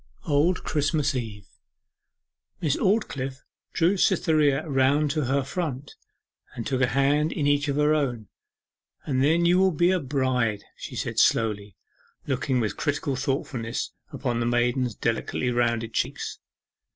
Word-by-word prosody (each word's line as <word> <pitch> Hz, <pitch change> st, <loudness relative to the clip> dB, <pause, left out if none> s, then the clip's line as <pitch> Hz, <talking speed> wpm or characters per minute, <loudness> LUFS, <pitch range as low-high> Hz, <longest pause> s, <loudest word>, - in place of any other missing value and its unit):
'Old 155 Hz, +4 st, +2 dB
Christmas 150 Hz, -1 st, 0 dB
Eve.' 110 Hz, -6 st, -5 dB, 1.1 s
Miss 150 Hz, -4 st, +1 dB
Aldclyffe 140 Hz, -, -1 dB, 0.3 s
drew 175 Hz, +4 st, +2 dB
Cytherea 155 Hz, -4 st, +2 dB
round 140 Hz, +1 st, +2 dB
to 155 Hz, -2 st, -1 dB
her 135 Hz, +2 st, +1 dB
front, 140 Hz, -2 st, -4 dB, 0.6 s
and 115 Hz, -, -5 dB
took 130 Hz, -1 st, -1 dB
a 125 Hz, -, +4 dB
hand 145 Hz, +4 st, +2 dB
in 145 Hz, -, -2 dB
each 145 Hz, +1 st, +2 dB
of 140 Hz, -, 0 dB
her 150 Hz, +1 st, +3 dB
own. 125 Hz, -8 st, -1 dB, 0.8 s
'And 130 Hz, -2 st, +1 dB
then 165 Hz, +4 st, +3 dB
you 175 Hz, +2 st, +4 dB
will 190 Hz, 0 st, +5 dB
be 175 Hz, +1 st, +2 dB
a 185 Hz, -, +2 dB
bride!' 130 Hz, -7 st, 0 dB
she -, -, -8 dB
said -, -, -2 dB
slowly, 105 Hz, -3 st, +1 dB, 0.5 s
looking 130 Hz, -1 st, 0 dB
with 105 Hz, -4 st, -2 dB
critical 145 Hz, -2 st, -1 dB
thoughtfulness 130 Hz, -3 st, -3 dB, 0.2 s
upon 120 Hz, -3 st, -2 dB
the 120 Hz, -, 0 dB
maiden's 120 Hz, 0 st, +1 dB
delicately 120 Hz, +2 st, -1 dB
rounded 115 Hz, -1 st, 0 dB
cheeks. -, -, -3 dB
135 Hz, 140 wpm, -25 LUFS, 120-150 Hz, 1.1 s, will